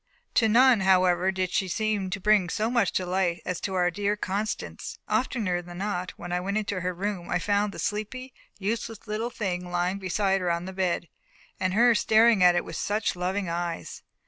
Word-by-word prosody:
To 225 -2 +4
none, 245 +1 +6
however, 185 -1 +3
did 185 -1 -2
she 190 - 0
seem 210 0 -1
to 190 +1 -3
bring 205 -2 +3
so 220 +6 -1
much 245 - +2
delight 180 -1 -1
as 180 -1 -3
to 190 - -3
our 180 -1 +2
dear 205 +3 -1
Constance. 205 +2 -4
Oftener 215 -5 0
than 175 0 -10
not, 185 -2 -2
when 175 - -7
I 180 - +1
went 200 +3 -2
into 200 -3 -2
her 180 +1 -1
room, 185 0 -4
I 175 - +1
found 205 +3 +1
the - - -10
sleepy, 245 +5 -4 0.2
useless 215 +2 -3
little 220 +2 -2
thing 180 -6 -3
lying 180 +2 -1
beside 195 +1 0
her 180 - 0
on 170 +1 -1
the 190 - -6
bed, 185 -2 -1 0.5
and 185 0 0
her 240 +2 +6
staring 220 -1 +4
at 180 -1 +6
it 175 - 0
with - - -6
such 210 -1 -1
loving 185 +2 -2
eyes! 170 0 -4
190 Hz, 200 wpm, -27 LUFS, 180-210 Hz, 0.5 s, none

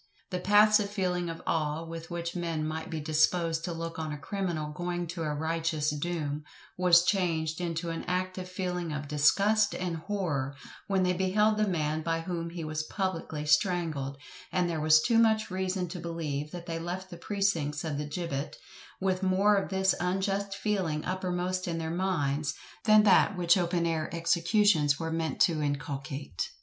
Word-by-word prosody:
The 180 - -1
passive 210 +2 +5
feeling 180 -4 -1
of 165 - -7
awe 155 0 -1
with 165 0 -7
which 170 0 -4
men 165 -3 -2
might 160 +1 -4
be 160 - -3
disposed 160 +2 +1
to 175 - -3
look 165 0 -5
on 155 -1 -3
a 150 - -4
criminal 165 -2 -3
going 175 +2 -3
to 170 0 -5
a 155 -2 -1
righteous 160 -1 0
doom, 150 -1 -3 0.3
was 175 -1 +6
changed 170 -4 0
into 170 -1 -2
an 165 - -5
active 185 0 -2
feeling 180 -3 -3
of 145 -1 -4
disgust 200 +9 +3
and 180 -2 -2
horror, 155 -7 -2 0.3
when 195 -2 +2
they 180 0 +2
beheld 210 +4 +2
the 215 0 +2
man 155 -4 0
by 165 0 -1
whom 170 -1 -3
he 170 -1 -6
was 155 0 -2
publicly 165 -3 -3
strangled; 150 -4 +1 0.3
and 180 -1 +1
there 165 -3 -2
was 155 0 +5
too 230 -2 +4
much 220 -3 +3
reason 185 0 -1
to 175 - -6
believe 155 -4 -3
that 175 +1 -8
they 165 -1 -3
left 180 +3 -5
the - - -6
precincts 170 -7 -1
of 150 -3 -2
the 150 0 -4
gibbet 150 -3 -3 0.4
with 190 -1 0
more 195 +2 +4
of 195 - 0
this 190 -1 +2
unjust 195 +2 -1
feeling 190 -8 -1
uppermost 185 0 -2
in 170 -1 -2
their 160 -1 -3
minds, 155 -5 0 0.3
than 215 -1 +7
that 195 -1 +5
which 175 -1 +4
open 175 -2 +1
air 160 -2 -1
executions 170 -2 +3
were 165 -1 -3
meant 165 -1 -2
to 160 -3 +3
inculcate. 140 - -3
170 Hz, 175 wpm, -29 LUFS, 155-185 Hz, 0.4 s, than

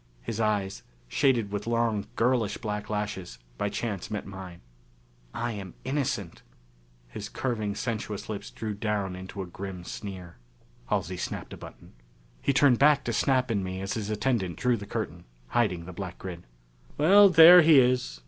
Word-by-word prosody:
His 115 -2 -4
eyes, 105 -3 0 0.3
shaded 115 - +1
with 105 +2 -4
long 115 -3 0
girlish 115 -4 +1
black 105 -2 -4
lashes, 105 - -4 0.2
by 100 - 0
chance 100 -4 -4
met 105 -1 -4
mine. 95 -3 -9 0.7
"I 120 - -3
am 100 -4 -7
innocent." 130 - -2 0.7
His 105 - -7
curving 110 -6 -2
sensuous 110 -4 -4
lips 105 -2 -5
drew 110 -1 -5
down 100 -2 -2
into 95 +1 -7
a - - -7
grim 90 0 -7
sneer.... 90 -2 -8 0.5
Halsey 90 +2 -1
snapped - - -5
a - - -8
button. - - -13 0.5
He - - +2
turned 130 -2 +4
back 145 -1 +5
to 120 - -2
Snap 130 +2 +2
and 100 -3 0
me 95 0 -4
as 95 +1 -3
his 105 -2 -4
attendant 105 - -1
drew 125 -1 +2
the 100 -3 -7
curtain, 85 -6 -5 0.2
hiding 90 - 0
the 90 - -8
black 90 0 -6
grid. 90 -4 -8 0.5
"Well, 195 +7 +7
there 175 +1 +10
he 155 -2 +6
is. 125 - +1
105 Hz, 165 wpm, -27 LUFS, 95-120 Hz, 0.7 s, there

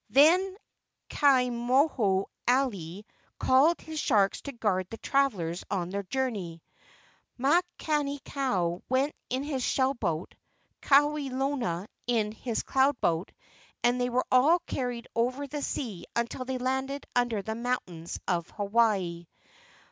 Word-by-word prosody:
Then 350 - +5 0.5
Ka 275 -3 +5
moho 240 -5 +2 0.2
alii 210 -8 0 0.3
called 285 +7 +4
his 315 -1 -5
sharks 205 -8 +2
to 280 - -6
guard 205 -7 -1
the 225 - -7
travellers 200 -14 0
on 180 -3 -2
their 200 +1 -2
journey. 200 -8 -3 0.7
Makani 295 0 +1
kau 185 -11 -1
went 265 +3 +1 0.2
in 260 +2 -1
his 285 -3 -2
shell 265 +1 +2
boat, 165 - -3 0.5
Kawelona 275 - +1 0.2
in 220 -3 +1
his 225 +1 -3
cloud 270 0 +2
boat, 165 +2 0 0.5
and 245 +1 +3
they 245 - +1
were 250 +1 0
all 280 +7 +6
carried 245 -3 -3
over 255 +5 0
the 290 +1 -5
sea 225 -9 -4
until 235 +2 -2
they 260 0 -2
landed 265 +2 -2
under 240 -4 +1
the 220 - -3
mountains 220 -9 -3
of 175 -2 -1
Hawaii. 200 -5 0
245 Hz, 125 wpm, -28 LUFS, 200-275 Hz, 0.7 s, all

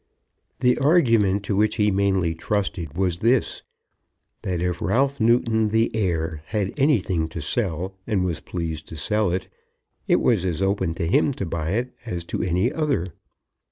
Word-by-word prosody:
The 125 +1 +3
argument 115 - +3
to 100 0 -1
which 105 +2 +2
he 105 -2 +2
mainly 95 -4 +1
trusted 85 -3 -3
was 90 -3 0
this, 120 +4 +1 0.8
that 90 -2 -2
if 90 -1 -2
Ralph 135 +7 +1
Newton, 110 -1 +3
the 110 +1 +1
heir, 80 -6 -1
had 105 -4 -2
anything 95 - +1
to 85 - -6
sell 90 +2 -2
and 100 -5 +1
was 85 -4 -2
pleased 80 -3 -5
to - - -9
sell 105 +7 0
it, 90 - -2 0.6
it - - +4
was 110 -7 +2
as 90 -3 -1
open 95 -3 0
to 85 - -2
him 100 - +2
to 100 - -4
buy 85 0 -2
it 120 +3 -2
as 90 -7 -4
to - - 0
any 90 - +1
other. 140 - -1
95 Hz, 165 wpm, -23 LUFS, 85-115 Hz, 0.8 s, it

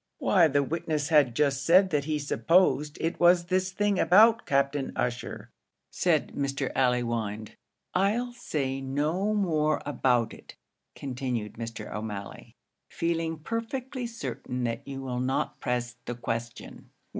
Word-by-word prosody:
"Why 175 -5 +4
the 145 -1 +2
witness 155 -1 -2
had 145 -7 +4
just 140 -1 +1
said 185 +4 +5
that 145 -2 0
he 155 0 0
supposed 150 0 +2
it 165 +2 -2
was 175 0 +5
this 185 +1 0
thing 205 0 0
about 220 +7 +5
Captain 140 0 +1
Ussher," 125 -1 -3 0.4
said - - +1
Mr. 135 -1 -2
Allewinde. 115 -4 0 0.4
"I'll 220 +6 +1
say 135 - -3
no 155 +10 0
more 155 -6 +1
about 125 -5 +1
it," - - -13 0.4
continued 125 -5 -4
Mr. 115 0 -7
O'Malley, 105 -2 -7 0.3
"feeling 165 -1 -1
perfectly 235 - -4
certain 130 - -5
that 115 +1 -3
you 135 -1 -5
will 125 -2 -3
not 135 +3 -1
press 120 -1 -2
the 120 - -4
question." 115 0 -6
145 Hz, 135 wpm, -28 LUFS, 125-175 Hz, 0.4 s, said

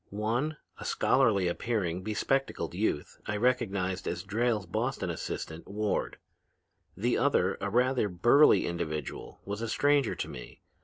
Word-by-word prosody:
One, 120 +9 -1 0.2
a - - -7
scholarly 110 -9 +3
appearing, 90 -2 -1
bespectacled 135 +7 -1
youth, 75 - -2
I 105 - -1
recognized 100 -6 0
as 85 0 -3
Drayle's 110 +1 0
Boston - - -2
assistant, 80 +1 -5
Ward; 105 +1 -2 0.8
the - - +1
other, - - +2
a 100 - -1
rather 125 0 +2
burly 120 - +5
individual, 80 -4 -4
was 100 +2 -4
a 115 - -2
stranger 145 0 +2
to - - -3
me. - - -10
105 Hz, 135 wpm, -30 LUFS, 90-120 Hz, 0.8 s, burly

